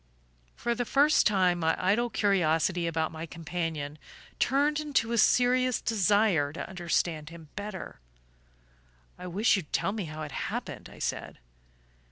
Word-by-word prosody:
For 235 Hz, 0 st, -1 dB
the 245 Hz, +1 st, -1 dB
first 285 Hz, +6 st, +4 dB
time 185 Hz, -4 st, +2 dB
my 160 Hz, -1 st, +2 dB
idle 210 Hz, +6 st, +1 dB
curiosity 175 Hz, -4 st, +1 dB
about 160 Hz, -1 st, -1 dB
my 160 Hz, +1 st, -6 dB
companion 160 Hz, -2 st, -4 dB, 0.4 s
turned 290 Hz, +3 st, +2 dB
into 285 Hz, -7 st, 0 dB
a 235 Hz, -, 0 dB
serious 250 Hz, +1 st, +3 dB
desire 205 Hz, -8 st, +2 dB
to -, -, -5 dB
understand 170 Hz, -3 st, -1 dB
him 165 Hz, -2 st, -12 dB
better. 205 Hz, -2 st, -6 dB, 1.2 s
"I 180 Hz, -, -7 dB
wish 200 Hz, +7 st, +3 dB
you'd 180 Hz, -7 st, -5 dB
tell -, -, 0 dB
me 205 Hz, -3 st, -4 dB
how 155 Hz, 0 st, -6 dB
it 150 Hz, -, -7 dB
happened," -, -, -5 dB
I -, -, -14 dB
said. -, -, -4 dB
185 Hz, 145 wpm, -28 LUFS, 165-230 Hz, 1.2 s, first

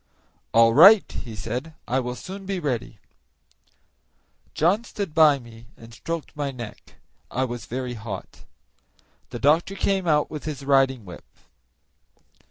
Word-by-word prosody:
"All 115 Hz, 0 st, +5 dB
right," 195 Hz, -, +8 dB
he 115 Hz, -3 st, -7 dB
said; 125 Hz, +10 st, -5 dB
"I 130 Hz, +2 st, +1 dB
will 125 Hz, -1 st, -4 dB
soon 195 Hz, +5 st, -9 dB
be 195 Hz, -2 st, -2 dB
ready." 125 Hz, -8 st, -3 dB, 1.6 s
John 185 Hz, +8 st, +2 dB
stood 200 Hz, -8 st, -5 dB
by 155 Hz, -3 st, +6 dB
me 115 Hz, -2 st, -14 dB
and 115 Hz, 0 st, -14 dB
stroked 165 Hz, +6 st, -6 dB
my 145 Hz, -1 st, -2 dB
neck; 120 Hz, -5 st, -10 dB, 0.3 s
I 130 Hz, -, -1 dB
was 120 Hz, -1 st, -7 dB
very 125 Hz, 0 st, -4 dB
hot. 110 Hz, -4 st, -8 dB, 0.8 s
The -, -, -6 dB
doctor 160 Hz, +7 st, +2 dB
came 195 Hz, -2 st, 0 dB
out 150 Hz, -2 st, +2 dB
with 150 Hz, -1 st, -7 dB
his 145 Hz, -3 st, -5 dB
riding 135 Hz, -4 st, +2 dB
whip. 90 Hz, -2 st, -11 dB
135 Hz, 140 wpm, -24 LUFS, 120-165 Hz, 1.6 s, right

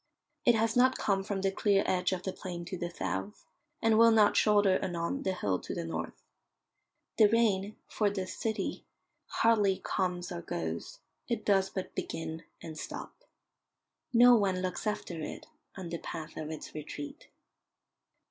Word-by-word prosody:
It 240 Hz, -, +6 dB
has 225 Hz, 0 st, +1 dB
not 255 Hz, +1 st, +5 dB
come 195 Hz, -2 st, +1 dB
from 195 Hz, -1 st, -3 dB
the 195 Hz, 0 st, +1 dB
clear 200 Hz, 0 st, +2 dB
edge 180 Hz, 0 st, +1 dB
of 185 Hz, -1 st, -2 dB
the 190 Hz, -, -3 dB
plain 175 Hz, -2 st, -6 dB
to 185 Hz, -, -5 dB
the 175 Hz, -1 st, -3 dB
south, 95 Hz, -, -4 dB, 0.4 s
and 225 Hz, -1 st, +4 dB
will 230 Hz, 0 st, +8 dB
not 215 Hz, -2 st, +5 dB
shoulder 205 Hz, -3 st, +4 dB
anon 175 Hz, +10 st, -2 dB
the 190 Hz, -, 0 dB
hill 100 Hz, -, 0 dB
to -, -, -6 dB
the -, -, -3 dB
north. 80 Hz, 0 st, -5 dB, 1.0 s
The 215 Hz, -, +8 dB
rain, 210 Hz, -2 st, +2 dB
for 210 Hz, -2 st, +1 dB
this 190 Hz, -2 st, -4 dB
city, 220 Hz, -1 st, -2 dB, 0.4 s
hardly 210 Hz, -4 st, +3 dB
comes 180 Hz, -2 st, -1 dB
or 175 Hz, -1 st, -4 dB
goes; 80 Hz, -, -4 dB, 0.3 s
it 230 Hz, -3 st, -2 dB
does 195 Hz, -2 st, +3 dB
but 190 Hz, -, -5 dB
begin 160 Hz, 0 st, -4 dB, 0.2 s
and 160 Hz, -1 st, -7 dB
stop. -, -, -6 dB, 1.0 s
No 245 Hz, +1 st, +8 dB
one 190 Hz, -4 st, +1 dB
looks 185 Hz, +4 st, -3 dB
after 180 Hz, -6 st, -3 dB
it -, -, -6 dB, 0.3 s
on 185 Hz, -3 st, -6 dB
the 170 Hz, 0 st, -4 dB
path 160 Hz, -2 st, -7 dB
of 155 Hz, -1 st, -5 dB
its 160 Hz, -1 st, -7 dB
retreat. 150 Hz, -1 st, -7 dB
190 Hz, 165 wpm, -31 LUFS, 170-210 Hz, 1.0 s, will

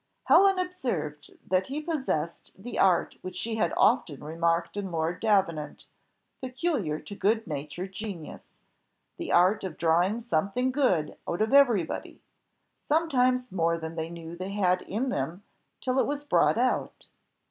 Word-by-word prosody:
Helen 390 Hz, 0 st, +5 dB
observed 245 Hz, -, -3 dB, 0.2 s
that 185 Hz, +1 st, +1 dB
he 280 Hz, +3 st, -3 dB
possessed 265 Hz, -, -3 dB
the 230 Hz, +6 st, -6 dB
art 185 Hz, -3 st, +3 dB
which 185 Hz, -, -7 dB
she 225 Hz, -1 st, -2 dB
had 175 Hz, -6 st, +1 dB
often 145 Hz, -3 st, +2 dB
remarked 165 Hz, +3 st, 0 dB
in 200 Hz, -2 st, -4 dB
Lord 165 Hz, +1 st, -1 dB
Davenant, 185 Hz, -9 st, 0 dB, 0.6 s
peculiar 255 Hz, -, -2 dB
to 155 Hz, +7 st, -9 dB
good 220 Hz, +3 st, +1 dB
natured 155 Hz, +4 st, -5 dB
genius 195 Hz, -6 st, -7 dB, 0.7 s
the -, -, -4 dB
art 185 Hz, +5 st, +4 dB
of 185 Hz, -5 st, -5 dB
drawing 175 Hz, +6 st, +2 dB
something 235 Hz, +4 st, 0 dB
good 250 Hz, -, +1 dB
out 175 Hz, +5 st, 0 dB
of 220 Hz, -, -1 dB
every 245 Hz, -10 st, +6 dB
body; -, -, -7 dB, 0.7 s
sometimes 255 Hz, -6 st, +2 dB
more 170 Hz, -2 st, +1 dB
than 160 Hz, 0 st, -6 dB
they 160 Hz, 0 st, -4 dB
knew 170 Hz, 0 st, -8 dB
they 185 Hz, +3 st, -5 dB
had 185 Hz, -3 st, +2 dB
in 240 Hz, +7 st, -2 dB
them 165 Hz, -, -3 dB, 0.4 s
till 255 Hz, 0 st, 0 dB
it -, -, +2 dB
was 290 Hz, 0 st, -3 dB
brought 285 Hz, -, +3 dB
out. 250 Hz, +2 st, -1 dB
195 Hz, 150 wpm, -28 LUFS, 165-250 Hz, 0.7 s, every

